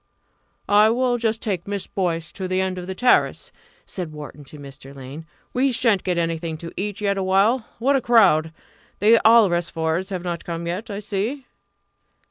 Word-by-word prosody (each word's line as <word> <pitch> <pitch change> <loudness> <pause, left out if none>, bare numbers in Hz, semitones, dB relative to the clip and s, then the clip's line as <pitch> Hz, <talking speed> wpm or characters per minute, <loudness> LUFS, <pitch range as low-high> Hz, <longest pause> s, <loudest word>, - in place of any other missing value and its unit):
"I 210 +1 +5
will 245 +1 +1
just 225 -1 -1
take 190 -6 -3
Miss 200 -1 -3
Boyce 165 -4 -2
to 190 -1 -5
the 185 0 0
end 190 -1 -2
of 180 - -8
the 190 - -5
terrace," 250 +5 +2 0.3
said 180 -5 -6
Wharton 150 -1 -10
to 150 - -12
Mr. 140 -1 -12
Lane; 140 +4 -10 0.3
"we 265 +2 +2
shan't 230 -5 +2
get 180 -2 -1
anything 165 -1 -2
to 165 +1 -9
eat 205 +1 -4
yet 200 -1 0
awhile. 200 +6 +2
What 275 +4 +2
a 270 - +2
crowd! 190 -10 +4 0.5
The 225 +3 +5
Alresfords 175 -5 +3
not 175 -2 -4
come 170 0 -5
yet, 180 +7 -4
I 200 0 -5
see." 215 +7 -3
190 Hz, 170 wpm, -22 LUFS, 165-220 Hz, 0.5 s, I